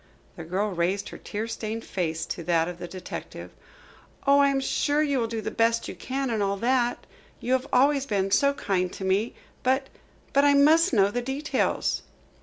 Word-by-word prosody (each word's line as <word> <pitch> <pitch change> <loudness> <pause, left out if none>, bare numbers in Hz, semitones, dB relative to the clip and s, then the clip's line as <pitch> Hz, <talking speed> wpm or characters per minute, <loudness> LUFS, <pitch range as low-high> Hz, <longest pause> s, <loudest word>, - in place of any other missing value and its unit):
The 170 - -8
girl 190 +6 -1
raised 185 +3 -1
her - - -9
tear 215 +2 -4
stained 225 0 -5
face 160 -3 -2
to 170 - -5
that 165 -2 +2
of 175 0 -7
the 175 - -6
detective. 185 +1 -8 0.7
"Oh, 280 0 +5
I 280 - +6
am 275 -1 +1
sure 290 +2 +1
you 280 -3 +1
will 230 - 0
do 225 -1 -4
the - - -4
best 230 0 +1
you - - -5
can 265 -1 -3
and 220 -2 0
all 200 0 0
that 245 +2 0 0.3
you 250 - -1
have 260 +1 0
always 275 +2 +3
been 195 -2 0
so 280 +7 +3
kind 185 -8 -1
to 190 - -6
me. 195 +5 0 0.3
But 265 +1 +1 0.4
but 280 - +4
I 285 0 +5
must 315 +5 +5
know 200 -5 +3
the 245 - -1
details." 270 +5 -1
230 Hz, 200 wpm, -26 LUFS, 195-275 Hz, 0.7 s, I